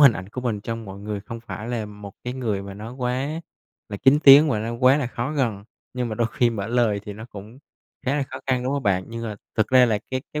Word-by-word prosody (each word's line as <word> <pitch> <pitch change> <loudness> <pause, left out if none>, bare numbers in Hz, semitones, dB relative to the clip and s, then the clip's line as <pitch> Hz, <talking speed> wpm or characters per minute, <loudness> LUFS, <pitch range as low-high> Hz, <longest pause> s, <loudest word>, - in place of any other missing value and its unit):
hình 140 -5 +9
ảnh 95 -1 -7
của 125 +5 -6
mình 115 -5 -2
trong 115 +2 -5
mọi 100 -1 -9
người 105 -1 -4
không 115 +2 -8
phải 115 -1 -7
là 115 -3 -2
một 105 -1 -10
cái 125 - -3
người 110 -7 -2
mà 100 0 -8
nó 110 +4 -8
quá 130 +5 -2 0.5
là 100 - -5
kín 135 +6 +5
tiếng 145 +3 +10
và 110 - +1
nó 115 +2 -3
quá 130 +3 +5
là 145 - -1
khó 120 +3 -3
gần, 115 -9 -1 0.3
nhưng 125 -1 -1
mà 110 - -3
đôi 115 +1 +1
khi 120 -5 +3
mở 100 -3 -3
lời 115 -4 +1
thì 105 - -6
nó 110 +2 -9
cũng 105 +5 -10 0.5
khá 140 +3 +2
là 145 - +1
khó 130 - -5
khăn, 130 -2 +1
đúng 130 - 0
hông 140 -1 -1
bạn? 95 -3 +1
Nhưng, 115 0 -6
ờ, 105 -2 -4 0.2
thực 110 - +2
ra 130 -1 +6
là 110 -2 +1
cái 130 -1 -2
cái 150 - -2
115 Hz, 275 wpm, -24 LUFS, 105-130 Hz, 0.5 s, tiếng